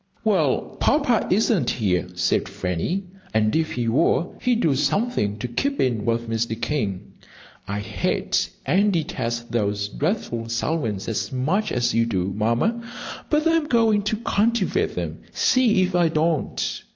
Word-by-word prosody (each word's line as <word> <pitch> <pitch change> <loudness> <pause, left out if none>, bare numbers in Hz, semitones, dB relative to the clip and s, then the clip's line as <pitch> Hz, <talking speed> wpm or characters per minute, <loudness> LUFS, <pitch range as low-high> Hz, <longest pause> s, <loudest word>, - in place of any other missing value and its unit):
"Well, - - +1
Papa 280 -6 +2
isn't 210 -1 +2
here," 90 -5 0
said 90 0 +1
Fanny, 90 - -2 0.3
"and 110 0 +2
if 160 0 0
he 120 -1 -2
were, 160 +8 +2
he'd 245 -2 +2
do 155 - +3
something 145 - 0
to 125 - -4
keep 275 - -1
in 115 -5 +1
with 115 0 0
Mr. 115 0 -2
King. 105 -9 -2 0.5
I 100 +1 -2
hate 105 - -1 0.2
and 195 +9 +3
detest 130 -9 -2
those 105 -3 0
dreadful 120 - -2
Selwyns 115 -4 -1
as 100 -3 -2
much 165 +12 0
as 120 -1 +1
you 115 0 +2
do, 95 -3 -1
Mamma, 115 - +1 0.5
but 300 +1 +2
I'm 330 -2 +2
going 225 -5 +3
to 215 - -1
cultivate 225 -1 +1
them. - - -4
See 230 -7 +3
if 185 0 -1
I 175 -2 +3
don't!" 160 0 -1
135 Hz, 150 wpm, -23 LUFS, -, 0.5 s, do